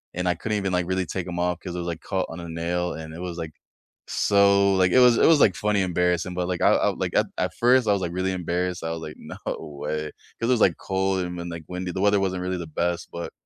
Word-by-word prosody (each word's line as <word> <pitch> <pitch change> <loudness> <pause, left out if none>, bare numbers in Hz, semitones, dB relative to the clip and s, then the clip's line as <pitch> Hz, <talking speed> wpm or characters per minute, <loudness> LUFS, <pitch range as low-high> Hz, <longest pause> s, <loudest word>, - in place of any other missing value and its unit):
and 90 0 -1
I 90 - +2
couldn't 105 +4 -2
even, 95 -1 -2
like, 90 -1 +1
really 95 0 0
take 95 +1 -4
'em 85 -1 -4
off 90 -1 0
'cause 90 -2 -7
it 90 - -3
was 85 - -4
like 85 -2 -3
caught 95 -2 -2
on 80 - -7
a 85 - -7
nail, 85 +2 -2
and 80 0 -8
it 85 - -8
was, 90 -2 -5
like, 80 -2 -5 0.6
so 100 -1 +4
like, 95 -1 +3
it - - +4
was 125 -2 +6
it - - +5
was, 160 -3 +6
like, 95 - +5
funny 105 -2 +1
embarrassing, 90 0 0
but, 90 -1 -1
like, 90 -1 -2
I - - +6
I, - - +3
like, - - -3
at - - +3
at - - -1
first 125 -1 +4
I - - +4
was, 100 - -1
like, 85 - -2
really 95 +1 -1
embarrassed. 90 0 -2
I 80 - -2
was, 80 0 -4
like, 75 - -7
"No - - -10 0.2
way." 75 +1 -4 0.3
'Cause 115 - 0
it - - +5
was, - - -3
like, 90 - 0
cold 95 0 -1
and 90 0 -6
then 85 0 -5
like, 85 -1 -7
windy, 90 0 -4
the 95 - -3
weather 100 0 +4
wasn't 95 -2 -1
really 90 0 -2
the 85 -2 -6
best, 85 0 -1
but 85 0 -6
90 Hz, 285 wpm, -25 LUFS, 85-95 Hz, 0.6 s, was